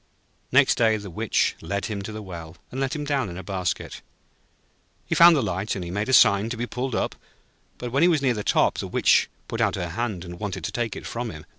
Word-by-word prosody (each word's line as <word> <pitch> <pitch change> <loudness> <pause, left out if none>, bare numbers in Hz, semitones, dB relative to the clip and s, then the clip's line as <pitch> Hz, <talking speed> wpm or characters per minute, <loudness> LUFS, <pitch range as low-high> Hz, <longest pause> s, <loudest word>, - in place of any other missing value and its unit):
Next - - +4
day 110 -2 +4
the 100 -3 -8
Witch - - +1
led 100 +4 -3
him 105 -2 -4
to 100 - -6
the 110 0 -7
well, 85 -3 -9
and 130 - -4
let 135 +3 -1
him 150 -1 -4
down 135 -7 0
in 85 - -7
a 95 - -7
basket. 95 -3 -3 1.0
He - - -2
found 170 0 +8
the 140 - +1
light, 95 +1 -2
and 90 -2 -5
made 105 +4 -2
a - - +1
sign 100 -2 +6
to 120 - -4
be 120 - -2
pulled 125 +1 -3
up; - - -1 0.6
but 120 -1 -6
when 135 +4 +1
he 175 - +6
was 160 -4 +3
near 130 -2 +3
the 105 -2 -4
top, - - +2
the - - -3
Witch - - +3 0.2
put - - -3
out - - +2
her 90 -2 -3
hand, 95 -1 -3
and 90 0 -9
wanted 105 -3 -4
to 105 - -3
take 115 0 -2
it - - -8
from 120 0 -4
him. 80 -4 -10
105 Hz, 250 wpm, -24 LUFS, 95-125 Hz, 1.0 s, found